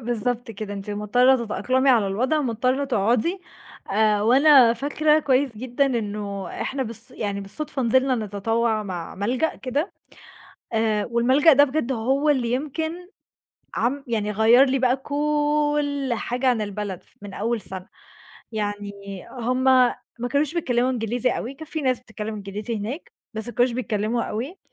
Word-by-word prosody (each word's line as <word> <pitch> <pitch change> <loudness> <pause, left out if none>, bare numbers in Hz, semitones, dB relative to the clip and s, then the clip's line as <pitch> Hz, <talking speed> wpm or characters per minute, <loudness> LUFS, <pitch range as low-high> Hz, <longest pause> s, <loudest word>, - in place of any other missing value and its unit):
بالضبط 240 +1 -2
كده، 210 -1 -6
أنتِ 200 +1 -6
مضطرة 240 +5 +3
تتأقلمي 260 +5 +1
على 225 -5 +4
الوضع، 255 +10 0
مضطرة 255 +2 0
تقعُدي 245 - +1 0.5
آآ، 210 0 +2
وأنا 260 +1 +6
فاكرة 300 +4 +2
كويّس 265 -4 +1
جدًا 255 +4 0
إنه 205 -5 -3 0.2
إحنا 270 0 -2
بالص 230 +1 -8
يعني 205 -5 -3
بالصُدفة 265 +8 -5
نزلنا 260 +2 +3
نتطوّع 220 +1 -1
مع 180 -4 -6
ملجأ 245 +10 -1
كده، 280 +8 -2 0.8
آآ، 220 -2 +1
والملجأ 260 +7 +5
ده 285 +2 +6
بجد 280 -2 -1
هو 265 +5 +1
اللي 250 -5 +1
يمكن 315 +6 -3 0.7
عم 275 +3 -1
يعني 215 -3 -1
غيّر 225 +5 +6
لي 270 0 +1
بقى 255 0 +2
كل 295 0 0
حاجة 245 +4 -2
عن 245 -3 +2
البلد 205 -3 -5
ف - - -25
من 200 -1 -8
أول 230 +2 -1
سَنة، 190 -1 -8 0.7
يعني 205 -1 -3 0.4
هم 255 +1 -2
ما 250 -2 +2
كانوش 285 +2 0
بيتكلِّموا 255 -6 +1
إنجليزي 245 +1 0
أوي 255 +4 -4
كان 315 +3 -10
في 315 0 -4
ناس 255 -3 +1
بتتكلِّم 220 -2 -6
إنجليزي 205 +2 -5
هناك، 225 +10 -6 0.2
بس 220 +1 -5
ما 240 - -7
كانوش 245 0 +2
بيتكلِّموا 230 -1 -1
أوي، 260 - -4
245 Hz, 150 wpm, -23 LUFS, 215-270 Hz, 0.8 s, وأنا